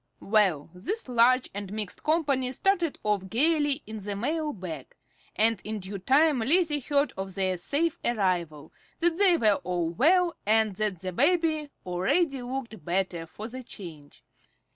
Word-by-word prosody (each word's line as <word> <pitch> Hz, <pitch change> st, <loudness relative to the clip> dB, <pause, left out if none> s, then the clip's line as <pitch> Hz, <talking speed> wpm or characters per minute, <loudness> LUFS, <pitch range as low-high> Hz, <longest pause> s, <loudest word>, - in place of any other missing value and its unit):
Well, 195 Hz, -8 st, +1 dB
this 330 Hz, -, -4 dB
large 250 Hz, +1 st, +3 dB
and 200 Hz, -1 st, -6 dB
mixed 210 Hz, -3 st, -4 dB
company 280 Hz, -5 st, +1 dB
started 350 Hz, 0 st, 0 dB
off 205 Hz, -3 st, -1 dB
gayly 290 Hz, -, +2 dB
in 220 Hz, 0 st, -7 dB
the 205 Hz, 0 st, -5 dB
mail 300 Hz, +8 st, -1 dB
bag, 170 Hz, -, -8 dB, 0.4 s
and 220 Hz, -3 st, +2 dB
in 215 Hz, +1 st, -4 dB
due 195 Hz, 0 st, -6 dB
time 280 Hz, -, +3 dB
Lizzie 300 Hz, +5 st, +2 dB
heard 285 Hz, +2 st, 0 dB
of 190 Hz, 0 st, -6 dB
their 190 Hz, -1 st, 0 dB
safe 290 Hz, -, -1 dB
arrival, 180 Hz, -9 st, -1 dB, 0.2 s
that 345 Hz, 0 st, +1 dB
they 375 Hz, -4 st, +5 dB
were 210 Hz, -6 st, +3 dB
all 175 Hz, -2 st, -1 dB
well, 340 Hz, -, +3 dB
and 215 Hz, -1 st, +2 dB
that 210 Hz, -5 st, -1 dB
the 185 Hz, -1 st, -4 dB
baby 310 Hz, -, +1 dB, 0.2 s
"already 270 Hz, -, 0 dB
looked 245 Hz, -3 st, -6 dB
better 175 Hz, -2 st, -2 dB
for 210 Hz, +6 st, -8 dB
the 255 Hz, +2 st, -8 dB
change." 160 Hz, -, -11 dB
225 Hz, 155 wpm, -27 LUFS, 190-295 Hz, 0.4 s, they